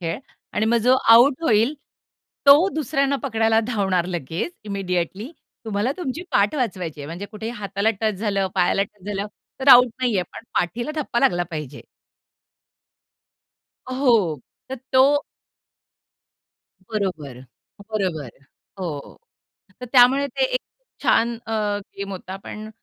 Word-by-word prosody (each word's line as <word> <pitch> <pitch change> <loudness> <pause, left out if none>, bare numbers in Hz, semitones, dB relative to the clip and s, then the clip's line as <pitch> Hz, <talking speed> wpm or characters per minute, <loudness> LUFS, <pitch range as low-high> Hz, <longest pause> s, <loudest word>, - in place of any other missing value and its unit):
खेळ 165 -1 -3 0.3
आणि 220 - 0
मग 235 - +3
जो 255 +1 +5 0.2
आउट 255 +6 +6
होईल 230 -1 +3 0.7
तो 295 +7 +8
दुसऱ्यांना 280 -2 0
पकडायला 225 -4 +2
धावणार 190 -7 0
लगेच 175 - -4
इमिडिएटली. 195 - -3 0.3
तुम्हाला 215 +4 -1
तुमची 325 -2 -4
पाठ 200 +5 +3
वाचवायची 185 - -3
आहे, 140 - -7
म्हणजे 170 +6 -6
कुठेही 220 +2 -6
हाताला 200 -1 -1
टच 215 -1 +1
झालं, 200 -2 0
पायाला 190 +1 +2
टच 200 -1 -11
झालं, 205 0 -3 0.3
तर 265 - +1
आउट 250 -1 +9
नाहीये, 230 -7 +1
पण - - -10
पाठीला 235 - -2
धप्पा 240 -4 -1
लागला 175 -10 +3
पाहिजे. 150 -4 -6 2.1
हो, 230 - +2 0.3
तर 265 - -3 0.2
तो 280 +3 +5 1.7
बरोबर, 160 - -4 0.5
बरोबर. 180 - -2 0.5
हो, 155 -6 -6 0.6
तर - - -4
त्यामुळे 265 +2 +5
ते 275 - -5
एक - - +1
खूप - - -27
छान 235 +1 +2
अ, 225 - -3 0.4
गेम 200 0 -5
होता, 190 0 -7
पण 215 +1 -8
215 Hz, 130 wpm, -22 LUFS, 185-255 Hz, 2.1 s, आउट